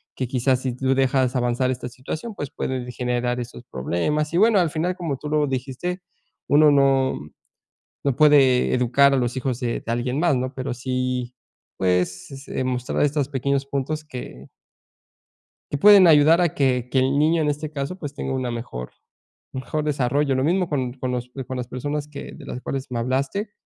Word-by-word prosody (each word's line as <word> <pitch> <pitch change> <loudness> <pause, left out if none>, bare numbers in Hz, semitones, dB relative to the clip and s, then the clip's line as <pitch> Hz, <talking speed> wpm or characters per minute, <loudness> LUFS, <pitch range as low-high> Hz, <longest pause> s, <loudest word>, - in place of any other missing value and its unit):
que 130 - -2
quizás 130 +1 +1
si 130 -2 -3
tú 130 +1 +1
dejas 130 -1 +2
avanzar 125 +1 +1
esta 125 0 -5
situación, 155 - -6
pues 145 - -5
pueden 125 -1 -4
generar 125 0 -1
estos 120 0 -7
problemas", 150 - -1
y - - +2
bueno, 215 0 +5
al 170 -3 +2
final, 175 +3 -1
como 165 -7 -3
tú 150 - -7
lo 150 -1 +2
dijiste, 135 +8 -3 0.5
uno 150 +1 +6
no 135 -1 +3 0.9
no 140 -3 +1
puede 140 -4 +5
educar 130 +3 +4
a - - +3
los 120 0 -1
hijos 130 -2 -2
de 120 -1 -2
de 115 - -4
alguien 125 +4 -1
más, 170 -5 +3
¿no?, 130 +1 -3
pero 130 -1 -3
sí 125 0 -3 0.4
pues, 90 +8 -1
eh, - - -2
mostrar 125 -1 -1
estos 145 -1 0
pequeños 140 0 -1
puntos 140 +3 -3
que 125 - -9 1.2
Que 145 - -1
pueden 200 +2 +8
ayudar 160 +1 +6
a 175 -3 +1
que 125 -3 +1
que 130 - +1
el 135 +2 +1
niño, 160 +2 +3
en 150 - 0
este 150 +1 -2
caso, 140 +5 -4
pues 145 -4 -6
tenga 135 -2 -4
una 130 -2 -2
mejor 115 - -6 0.6
un 130 - -5
mejor 150 +5 -3
desarrollo. 140 -1 +1
Lo 130 - 0
mismo 180 +2 +1
con 130 -4 -1
con 130 -1 -4
los 125 0 -4 0.2
con 130 - -5
las 125 -1 -4
personas 145 +3 -4
que 145 - -8
de 140 -4 -12
las 125 - -6
cuales 135 +1 -4
me 120 - -2
hablaste 135 - -1
135 Hz, 190 wpm, -23 LUFS, 125-150 Hz, 1.2 s, pueden